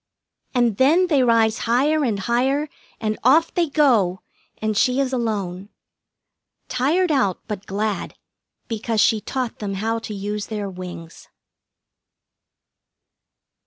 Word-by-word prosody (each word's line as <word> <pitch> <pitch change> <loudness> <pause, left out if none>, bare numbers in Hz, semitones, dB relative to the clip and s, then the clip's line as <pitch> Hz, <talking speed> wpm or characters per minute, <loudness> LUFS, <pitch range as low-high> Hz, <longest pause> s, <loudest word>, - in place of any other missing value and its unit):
And 240 -4 +2
then 315 +8 +4
they 290 -5 +3
rise 230 -2 +3
higher 290 +6 +3
and 225 -6 0
higher, 265 +7 0 0.3
and 215 -1 -2
off 310 +7 +4
they 340 -3 +1
go, 230 - +2 0.4
and 215 0 -2
she 250 +5 +2
is 270 -1 0
alone. 200 -6 -2 1.0
Tired 310 +8 +1
out 225 - +1
but 205 -2 -6
glad, 205 +1 -2 0.5
because 225 0 -2
she 215 +1 +3
taught 250 +2 -4
them 200 -2 -3
how 225 +3 -1
to 220 -2 -7
use 205 +1 -4
their 205 -3 -4
wings. 180 -3 -9
225 Hz, 125 wpm, -22 LUFS, 205-265 Hz, 1.0 s, then